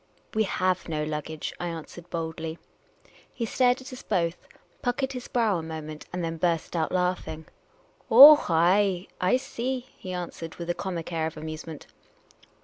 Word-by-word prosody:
" - - -37
We 220 -1 +2
have 185 -2 0
no 155 -1 -1
luggage," 150 0 -4
I 175 - -2
answered 165 +1 -8
boldly. 160 -1 -4 0.7
He 235 - -3
stared 250 +3 +2
at 260 0 -10
us 255 - -8
both, 175 -4 -1 0.3
puckered 260 +2 -1
his 250 -2 -6
brow 220 -7 +1
a - - -4
moment, 155 -1 -7
and 180 -1 -3
then 165 0 -3
burst 170 0 0
out 160 -2 0
laughing. 180 -3 -1 0.3
" - - -33 0.2
Oh, 290 +6 +11
ay, 180 +3 +3 0.2
I 185 +7 +4
see," 255 0 -4
he 185 - -7
answered, 170 -2 -6
with 170 0 -3
a - - 0
comic 175 -2 -5
air 160 -1 0
of 160 - -8
amusement. 155 0 -7
175 Hz, 170 wpm, -27 LUFS, 160-220 Hz, 0.7 s, Oh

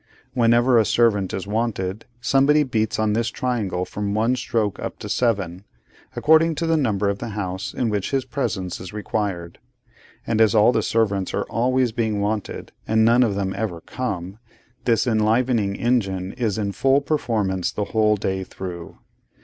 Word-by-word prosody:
Whenever 120 0 +4
a - - +5
servant 105 -4 +2
is 95 - -4
wanted, 105 -2 -2
somebody 140 +4 +3
beats 110 -5 -1
on 110 -1 +1
this 115 +1 0
triangle 105 -9 -2
from 100 +1 -3
one 115 +4 +2
stroke 110 -5 -1
up - - -5
to - - -7
seven, 100 -7 -1 0.5
according 160 +1 +4
to 165 - -2
the 165 0 +2
number 105 -9 +1
of 100 0 -1
the 120 - -5
house 95 -1 -3
in 125 - -1
which 105 -3 -1
his 135 -2 0
presence 100 - -3
is 90 - -8
required; 100 -5 -3 0.7
and 115 -1 +1
as 110 -1 +4
all 110 +2 +6
the 110 - +1
servants 100 -4 0
are - - -1
always 125 +1 +1
being 110 -3 -1
wanted, 105 0 -3 0.2
and 110 0 +3
none 120 +2 +5
of 110 -5 +2
them 95 -1 -1
ever 100 -5 -3
come, 100 -2 -5 0.5
this 115 -2 +2
enlivening 110 -2 +1
engine 100 -7 0
is 115 -5 -1
in 100 -2 -1
full 135 +6 +3
performance 110 - -1
the 105 - -2
whole 110 -1 +4
day 95 -1 -2
through. 90 -2 -8
110 Hz, 170 wpm, -22 LUFS, 100-120 Hz, 0.7 s, all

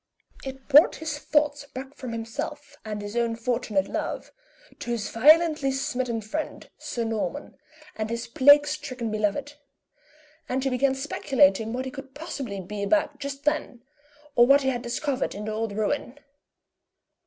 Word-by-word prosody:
It 265 0 -8
brought 295 +3 +7
his 310 -2 -4
thoughts 295 -1 +1
back 265 0 -8
from 255 -4 -7
himself 250 +6 -5
and 210 -1 -4
his 205 +2 -6
own 235 -1 +1
fortunate 230 -4 0
love, - - -4 0.5
to - - -6
his 230 -3 -2
violently 305 +2 +5
smitten 250 -3 -2
friend, 300 +9 -5
Sir 235 - -3
Norman, 225 +6 -3 0.4
and 215 0 -3
his 235 +1 -3
plague 285 +5 +6
stricken 275 -6 -4
beloved; 215 +8 -1 0.9
and 260 +1 0
he 270 - 0
began 265 +2 +2
speculating 225 -6 +2
what 255 +2 -3
he 260 - -5
could 270 -1 -10
possibly 275 - -5
be 200 +3 -6
about 290 +5 +1
just 280 0 -5
then, 295 -5 -1 0.5
or 240 0 +6
what 280 +1 +6
he 265 - +2
had 245 -2 -2
discovered 255 +3 -2
in 210 +1 -5
the 215 - -3
old 220 0 -2
ruin. 220 +6 -2
260 Hz, 155 wpm, -26 LUFS, 225-285 Hz, 0.9 s, brought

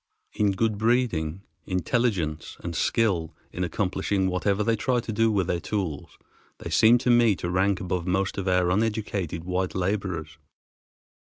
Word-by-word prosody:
In 105 -2 +1
good 110 +1 0
breeding, 105 -8 0 0.2
intelligence, 90 -4 -1
and 85 -1 -5
skill 85 -9 0 0.2
in 90 - -2
accomplishing 95 +2 -1
whatever 100 +3 0
they 115 +1 +2
try 125 +3 0
to 115 - -5
do 115 +1 +2
with 90 -4 0
tools 95 -9 -4 0.4
they - - -7
seem 115 +2 +6
to 125 - +4
me 120 -3 +5
to 85 -1 -4
rank 95 +1 +2
above 90 -1 -3
most 95 +2 0
of 95 - -4
our 90 -1 +2
uneducated 100 -5 -1
white 90 +1 -2
laborers. 90 -5 -2
95 Hz, 150 wpm, -26 LUFS, 90-110 Hz, 0.4 s, seem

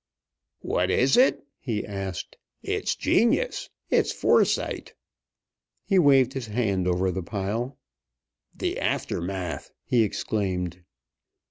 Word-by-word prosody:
"What 90 +1 0
is 130 +7 +3
it?" 255 - +4
he 115 -5 -3
asked. 95 -3 -5 0.3
"It's - - -1
genius! 290 - +1 0.2
It's - - +3
foresight!" - - +1 0.9
He 195 -2 +3
waved 135 -5 +5
his 130 -4 -4
hand 100 -5 0
over 90 +1 +1
the 95 - -3
pile. 105 +8 -3 0.8
"The - - -2
Aftermath!" 90 -1 -2 0.2
he 120 - +3
exclaimed. 95 -4 -2
105 Hz, 105 wpm, -26 LUFS, 95-130 Hz, 0.9 s, waved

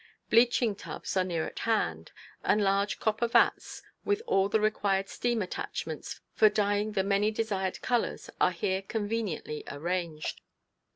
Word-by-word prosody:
Bleaching 235 -2 +4
tubs - - -6
are 185 - +3
near 170 -3 -1
at - - -7
hand, 85 - 0 0.3
and 210 - +3
large 200 +1 +1
copper 220 +2 +1
vats 235 0 +2 0.2
with 410 +2 0
all 195 - +2
the 220 +1 +3
required 200 -2 +1
steam 240 -1 -1
attachments 180 - -5
for 215 - +6
dyeing 205 0 0
the 195 -2 +1
many 200 +2 +2
desired 205 -4 -2
colors 240 -2 0
are - - +6
here 190 +2 -1
conveniently 205 -7 -3
arranged. 165 +1 -3
205 Hz, 140 wpm, -29 LUFS, 190-220 Hz, 0.3 s, for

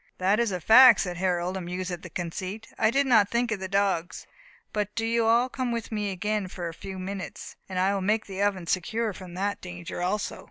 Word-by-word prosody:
"That 195 +4 +2
is 235 -3 +1
a 180 - -2
fact," 235 +5 +8
said 180 -2 -3
Harold, 180 0 0
amused 180 0 -4
at 175 -1 -5
the 180 - -9
conceit. 185 +6 -5
"I 220 - +3
did 275 +4 +2
not 220 -6 +4
think 235 0 0
of 215 - -1
the 190 - -4
dogs. 190 -3 0 0.5
But 210 -1 -2
do 225 0 -1
you 230 0 +1
all 235 +2 +4
come 255 -1 -3
with 230 -1 -4
me 210 -2 -1
again 205 +1 -2
for 175 -1 -5
a 165 - -6
few 190 +3 -8
minutes, 190 +1 -6
and 185 - -4
I 190 +2 +2
will 195 - -1
make 210 +3 +1
the 195 0 -5
oven 200 -3 0
secure 215 +6 -1
from 180 -2 -10
that 200 +2 -2
danger 175 -1 -7
also." 210 +5 -2
195 Hz, 230 wpm, -27 LUFS, 185-220 Hz, 0.5 s, fact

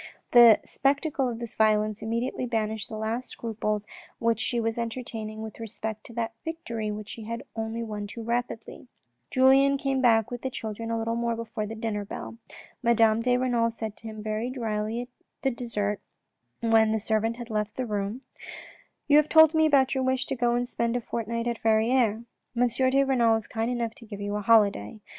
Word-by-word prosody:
The 235 -3 +8
spectacle 275 -1 +1
of 235 - -4
this 235 -1 -4
violence 215 -1 +2
immediately 235 +3 -2
banished 220 -2 -2
the 220 - -5
last 225 +3 -3
scruples 215 -2 -3 0.3
which 230 -1 +1
she 240 0 +1
was 225 0 -1
enter 235 +2 -3
taining 220 -2 -6
with 220 0 -8
respect 220 -1 -5
to 235 - -12
that 230 -1 -2
victory 235 -10 -4
which 210 0 -6
she 225 - -7
had 230 +1 -5
won 225 0 -3
only 210 -3 -4
too 230 +3 -8
rapidly. 235 +1 -4 0.4
Julien 270 +2 +5
came 270 -1 0
back 225 -3 +3
with 245 -1 -5
the 260 - -2
children 225 -2 -5
a 230 - 0
little 225 +1 -1 0.2
before 225 -2 -4
the 225 - -6
dinner 220 -2 -3
bell. 110 - -7 0.4
Madame 230 -2 +4
de 245 +1 +2
Renal 245 -2 +1
said 220 -2 -5
to 225 - -9
him 215 -1 -7
very 215 +3 -2
drily 225 -1 -3 0.4
at 265 -3 +1
dessert 210 -4 -2 0.6
when 225 -1 +4
the 220 0 +1
servant 220 +2 0
had 240 -1 -8
left 210 0 -2
the 255 - -2
room: 210 +2 -3 0.4
" - - -24
You 295 0 +6
have 305 0 +4
told 315 -1 +7
me 315 0 +4
about 270 -3 +4
your 265 -1 0
wish 260 0 +1
to - - -3
go 240 -1 +1
and 245 0 0
spend 235 -1 -1
a 245 - 0
fortnight 230 0 -3
at 235 -1 -2
Verrieres. 225 0 +2 0.3
M. 245 +1 +4
de 260 +3 +2
Renal 240 -4 +3
is 225 -1 -3
kind 225 +1 -2
enough 235 -2 -2
to 230 - -12
give 205 -2 -8
you 205 0 -3
a 210 - -1
holiday. 210 - +3
230 Hz, 200 wpm, -27 LUFS, 220-245 Hz, 0.6 s, The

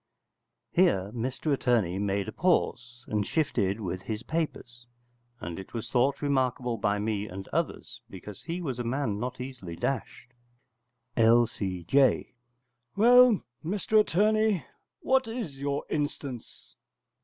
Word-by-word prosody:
[Here 100 - +3
Mr 130 +5 -1
Attorney 115 -9 +1
made 100 -1 -1
a - - -4
pause, 120 -9 0
and 105 -1 0
shifted 105 - 0
with 90 -3 -4
his 110 +2 -5
papers: 120 -7 -4 0.5
and 85 +1 -6
it 95 - -10
was 115 0 -5
thought 135 +3 +2
remarkable 130 -4 0
by 105 0 +1
me 105 0 -2
and 95 +1 -7
others, - - -3
because 95 +1 -10
he 170 +2 -4
was 130 -6 -3
a - - -1
man 115 -4 -1
not 125 +2 -4
easily 125 -10 -7
dashed.] 125 +1 -4 0.8
L.C.J. 115 0 +3 0.6
Well, 245 0 +6 0.2
Mr 205 +5 +2
Attorney, 215 -1 +2 0.4
what 265 -1 +2
is 215 - -5
your 140 0 -1
instance? 145 -4 -5
125 Hz, 125 wpm, -28 LUFS, 105-155 Hz, 0.8 s, Well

